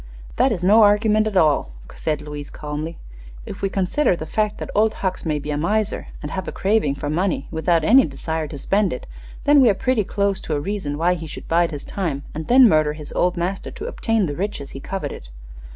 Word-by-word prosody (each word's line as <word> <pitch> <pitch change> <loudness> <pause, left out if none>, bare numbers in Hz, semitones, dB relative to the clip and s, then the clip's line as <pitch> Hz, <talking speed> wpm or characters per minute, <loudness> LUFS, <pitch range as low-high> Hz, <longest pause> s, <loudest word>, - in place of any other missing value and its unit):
"That - - +3
is 175 - -2
no 210 +5 +6
argument 210 +1 +4
at 205 -3 -1
all," 150 - +2 0.2
said 155 -2 -2
Louise, 150 -1 -7
calmly. 150 +2 -5 0.5
"If - - -8
we 195 - 0
consider 190 +5 +1
the 155 - -6
fact 210 +5 -1
that - - -6
Old 215 +1 +2
Hucks 185 -2 -2
may 150 -1 0
be 150 +1 -4
a 145 - -1
miser, 210 +6 -1 0.2
and 150 - -5
have 190 -1 -4
a - - -3
craving 195 -8 +1
for 145 - -5
money 165 -1 -1
without 165 0 +1
any 255 +10 +6
desire 160 +2 -4
to 145 - -7
spend 195 +6 +1
it, 125 - -7 0.4
then 290 -1 +6
we 250 - +6
are 200 - +3
pretty 255 +1 +1
close 200 0 -1
to 155 - -3
a - - 0
reason 150 -4 -3
why 170 +3 +2
he 165 -2 -6
should - - -9
bide 170 +1 +2
his 145 -3 -6
time 160 -8 -3
and 155 +1 -5
then 255 0 +7
murder 155 -5 +3
his 150 -1 -9
old 180 0 +1
master 180 +3 -2
to 420 - -8
obtain 225 - 0
the 145 -3 -3
riches 180 -6 -4
he 135 - -8
coveted. 180 - -6
175 Hz, 225 wpm, -22 LUFS, 150-210 Hz, 0.5 s, then